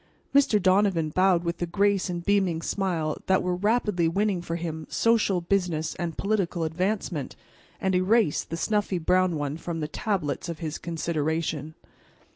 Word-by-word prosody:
Mr. 275 -7 +4
Donovan 185 -4 +3
bowed 185 +1 +3
with 170 0 -2
the 175 - -2
grace 200 +2 +1
and 175 -1 -4
beaming 190 -5 +1
smile 170 -6 -1
that 190 0 +3
were 180 0 0
rapidly 205 -3 +1
winning 195 +1 0
for 165 -1 -4
him 160 -2 -5
social, 220 -5 +2
business 170 -4 0
and 170 -3 -4
political 195 -5 0
advancement, 175 -3 -2 0.4
and 190 0 0
erased 185 -3 +2
the 165 - -3
snuffy 205 0 0
brown 180 +1 +2
one 145 0 -3
from 165 0 -5
the 150 - -2
tablets 160 - -2
of 165 - -4
his 155 -2 -5
consideration. 160 -2 -2
175 Hz, 155 wpm, -26 LUFS, 160-195 Hz, 0.4 s, Mr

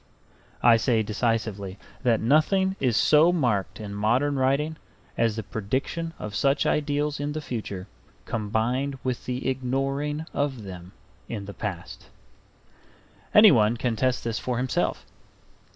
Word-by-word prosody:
I 115 -1 +7
say 115 -1 +2
decisively 105 -3 -2 0.2
that 120 -4 +2
nothing 190 - +3
is 125 -4 +1
so 155 +3 +5
marked 120 - 0
in 105 -2 -6
modern 120 +8 +1
writing 145 +4 +1 0.4
as 115 -2 +1
the 110 - -4
prediction 130 - -3
of 105 - -6
such 140 +6 +2
ideals 145 0 0
in 145 +1 -2
the 155 - -3
future 110 -9 -5 0.4
combined 115 +6 -1
with 130 -2 -3
the 125 +1 -3
ignoring 135 +4 -1
of 140 -5 -2
them 90 -2 -9 0.4
in 105 -4 -4
the 100 - -8
past. 100 -6 -6 1.3
Anyone 120 - +7
can 120 -1 -1
test 130 +2 0
this 115 -1 -2
for 125 -2 -2
himself. 125 +1 -1
125 Hz, 135 wpm, -26 LUFS, 110-145 Hz, 1.3 s, I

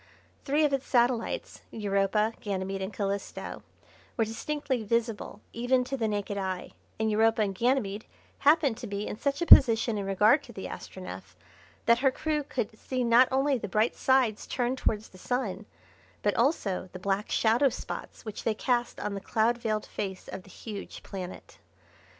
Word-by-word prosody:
Three 300 +2 +3
of 290 - +1
its 275 0 -1
satellites, 240 -2 +1
Europa, 210 +1 +1
Ganymede, 195 -1 -3
and 190 +2 -3
Calisto, 200 0 -4 0.6
were 225 - +3
distinctly 265 +3 -2
visible 225 -1 -2
even 250 +2 +2
to 270 +2 -3
the 230 -4 0
naked 205 -1 -2
eye, 185 -2 -3 0.3
and 220 0 +1
Europa 225 +1 +3
and 195 -2 -1
Ganymede, 220 -2 0 0.3
happened 290 -5 +4
to 240 - -6
be 200 0 -3
in - - -4
such 280 +8 -1
a - - -1
position 230 -6 +7
in 195 - -3
regard 210 +8 +4
to - - -13
the - - -7
Astronef - - -8 0.5
that 235 0 +5
her 270 - +4
crew 300 +3 -1
could 250 -6 -4
see 255 -1 -2
not 240 +2 +6
only 270 0 +2
the 210 - -4
bright 215 +4 +1
sides 260 -5 +2
turned 250 +1 -1
towards 215 0 -1
the 185 - -16
Sun, 220 -4 -2 0.6
but 205 - +2
also 225 - 0
the - - -5
black 195 +2 -1
shadow 235 +5 +3
spots 245 - -7
which 215 -2 -6
they 220 - +1
cast 240 +1 0
on 210 - -3
the 195 - -4
cloud 230 +4 +1
veiled 215 -2 -1
face 190 -2 -5
of 190 - -6
the 185 - -18
huge 205 +1 -8
planet. 185 -2 -8
225 Hz, 175 wpm, -29 LUFS, 200-255 Hz, 0.6 s, position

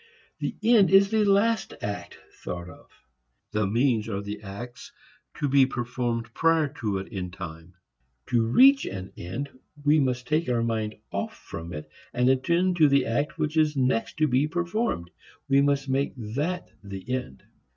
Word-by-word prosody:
The - - -3
"end" 225 -4 +6
is 195 +1 +6
the 220 -1 +3
last 205 +3 +2
act 100 0 -5 0.3
thought 85 0 -5
of; - - -14 0.6
the 105 -2 +1
means 115 0 +1
are 100 -3 -2
the 105 +1 -6
acts 110 +4 -9 0.5
to 145 - 0
be 135 -1 +5
performed 120 -2 -3
prior 160 -1 +3
to 105 -4 -1
it 95 - -5
in 95 -5 -4
time. 85 -1 -9 0.5
To 120 -2 +3
reach 265 - +6
an 95 0 -6
end 115 +12 -5 0.4
we 150 +1 +5
must 125 -3 0
take 155 -1 +1
our 120 -2 +1
mind 110 -2 -1 0.2
off - - -3
from 85 +1 -8
it 75 -2 -6 0.3
and 125 +1 +3
attend 170 +7 +2
to 155 -3 +6
the 140 0 +3
act 145 +8 -1
which 150 +1 -1
is 155 -2 +2
next 125 -3 0
to 155 0 +3
be 135 +2 +2
performed. 175 - -2 0.4
We 135 0 +4
must 140 -1 +1
make 135 +1 0
that 145 +11 -3 0.2
the 100 -1 -8
end. 125 - -4
125 Hz, 170 wpm, -26 LUFS, 105-155 Hz, 0.6 s, end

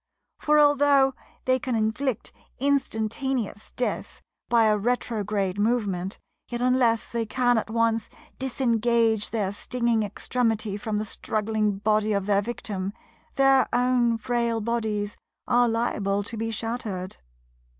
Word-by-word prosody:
For, 300 0 +3
although 285 -2 +5 0.3
they 255 0 +3
can 255 -1 -2
inflict 220 +3 -1 0.2
instantaneous 255 -4 -1
death 250 - -3 0.3
by 235 -1 +5
a 215 -1 +4
retrograde 210 -4 -1
movement, 205 -4 0 0.3
yet 240 - -3
unless 245 -2 +2
they 235 -1 -1
can 245 0 +2
at 220 - -6
once 230 -1 +1 0.3
disengage 235 -4 +1
their 205 -4 -1
stinging 235 +1 0
extremity 220 0 -1
from 210 0 -3
the 215 - -2
struggling 215 -1 -1
body 215 +1 +1
of 200 -1 0
their 200 -1 +3
victim, 200 -3 -4 0.4
their 270 -1 +5
own 245 -1 +2
frail 235 -1 0
bodies 215 -2 -2 0.3
are 245 -1 +4
liable 205 -3 0
to 230 - -5
be 225 +1 -2
shattered. 220 -4 -4
225 Hz, 125 wpm, -25 LUFS, 210-245 Hz, 0.4 s, although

